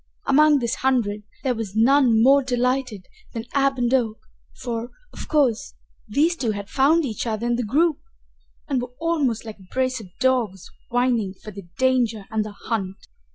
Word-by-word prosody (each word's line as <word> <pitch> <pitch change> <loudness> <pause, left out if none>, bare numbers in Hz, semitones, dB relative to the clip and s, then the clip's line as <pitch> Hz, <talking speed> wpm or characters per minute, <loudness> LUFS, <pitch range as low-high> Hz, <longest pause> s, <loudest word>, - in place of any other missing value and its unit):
Among 300 +2 +5
this 235 -2 -1
hundred 235 -6 0 0.2
there 260 - +1
was 220 -4 -6
none 235 -1 +4
more 275 +2 +6
delighted 250 -4 -1 0.3
than 225 0 -4
Ab 275 -1 +2
and 245 0 0
Oak, 225 -4 +1 0.4
for, 235 -1 -4 0.2
of - - -8
course, 270 -8 +1 0.3
these 305 +11 +2
two 235 -9 -1
had 200 -1 -7
found 300 +4 +3
each 235 -1 -4
other 220 +1 -2
in 240 0 +1
the 245 - -1
group, 295 +7 +1 0.7
and 270 -4 0
were 245 0 -8
almost 295 -10 0
like 220 -2 -9
a 190 - -17
brace 255 -1 0
of 205 -5 -11
dogs 245 -8 0 0.2
whining 240 -5 0
for 215 - -11
the 200 -3 -11
danger 245 -5 +1
and 220 -1 0
the 210 -1 -8
hunt. 195 -4 -3
245 Hz, 175 wpm, -23 LUFS, 220-265 Hz, 0.7 s, more